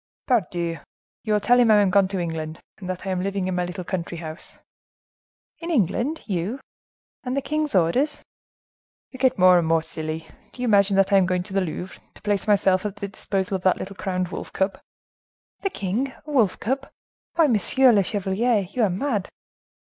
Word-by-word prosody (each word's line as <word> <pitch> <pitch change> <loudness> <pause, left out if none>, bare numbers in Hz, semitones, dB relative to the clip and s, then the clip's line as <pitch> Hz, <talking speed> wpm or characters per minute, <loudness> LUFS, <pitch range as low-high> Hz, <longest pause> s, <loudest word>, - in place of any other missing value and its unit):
"Pardieu! 175 -8 0 0.4
You 215 - -1
will 210 - +3
tell 245 +4 +4
him 240 -2 +5
I 215 - +7
am 200 -2 +3
gone 200 0 +5
into 190 +1 -3
England; 160 -2 -4 0.2
and 185 -3 -7
that 185 +1 -4
I 190 - -2
am 185 -1 -1
living 195 -1 -2
in 185 - -1
my 180 0 0
little 180 +1 -6
country 175 -1 -4
house." 160 +1 -8 1.0
"In 335 - -6
England, 260 - 0
you!—And 235 +6 -6
the - - +4
king's 305 -4 -1
orders?" 250 - +2 0.9
"You 260 - -11
get 260 0 +3
more 185 -1 +7
and 165 - -1
more 165 0 +2
silly: 160 0 -5 0.3
do 250 - -6
you - - 0
imagine 200 -2 +4
that 195 +1 +3
I - - +7
am 185 -2 +4
going 180 -1 0
to 190 - -11
the 195 - +2
Louvre, 180 +1 -5
to - - -15
place 205 0 0
myself 190 -2 +3
at 210 -1 -4
the 200 -1 -5
disposal 195 -1 -2
of - - -13
that 185 -1 +3
little 195 +1 -7
crowned 185 -2 -2
wolf - - -6
cub?" 190 +1 -1 0.8
"The 390 - -1
king 230 - -2
a 305 - -7
wolf 230 -10 +2
cub? 270 +4 -2 0.5
Why, 330 -1 +5
monsieur 255 - +4
le 205 -3 +4
chevalier, 205 +4 0
you 250 - -1
are 215 - +4
mad!" 205 +1 -1
195 Hz, 200 wpm, -24 LUFS, 180-235 Hz, 1.0 s, I